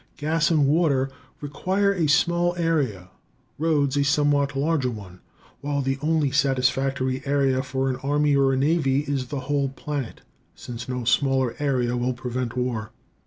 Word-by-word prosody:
Gas 160 +2 +1
and 155 -4 +3
water 140 -3 +2 0.3
require 190 +7 0
a 170 -5 0
small 175 +4 +2
area, 140 - -1 0.5
roads 145 -4 +1
a 140 - +2
somewhat 145 0 +2
larger 140 -2 +1
one, 100 -6 -9 0.4
while 140 -1 -2
the 135 +1 -1
only 155 -2 +1
satisfactory 130 -1 +1
area 140 -2 +1
for 130 0 -2
an 130 -1 -1
army 145 +2 +1
or 135 -1 +3
a 130 - 0
navy 140 -1 +2
is 140 -3 -3
the 140 0 -4
whole 140 +1 0
planet, 140 -2 -5 0.3
since 120 +1 -8
no 125 -1 -3
smaller 130 0 +1
area 125 -4 0
will 125 +1 0
prevent 125 0 -4
war. 120 -3 -2
140 Hz, 155 wpm, -24 LUFS, 130-150 Hz, 0.5 s, and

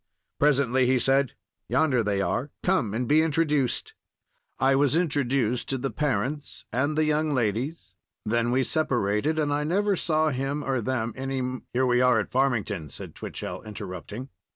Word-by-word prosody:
Presently 130 -3 +3
he 130 +1 +4
said, 135 +1 +2 0.4
"Yonder 140 -6 +3
they 100 -2 0
are; 130 +7 -1
come 130 - +1
and 125 +1 -1
be 155 +4 +5
introduced." 155 - 0 0.6
I 135 +1 +3
was 140 +1 +3
introduced 135 -7 0
to 135 - 0
the 135 +1 -3
parents 145 0 -2
and 145 +5 0
the 155 - +4
young 155 -1 +1
ladies; 120 - -2 0.3
then 120 +2 +1
we 130 +2 +2
separated, 125 -1 0
and 145 -2 +1
I 145 +1 0
never 200 +6 +1
saw 155 -2 +1
him 135 +2 -2
or 130 -3 0
them 115 -1 -1
any 135 0 -3
m— 130 0 -4
"Here 130 +1 +2
we 125 0 +3
are 125 -2 +4
at 105 - -4
Farmington," 110 - 0
said - - -9
Twichell, - - -6
interrupting. 105 +3 -7
135 Hz, 165 wpm, -26 LUFS, 120-150 Hz, 0.6 s, be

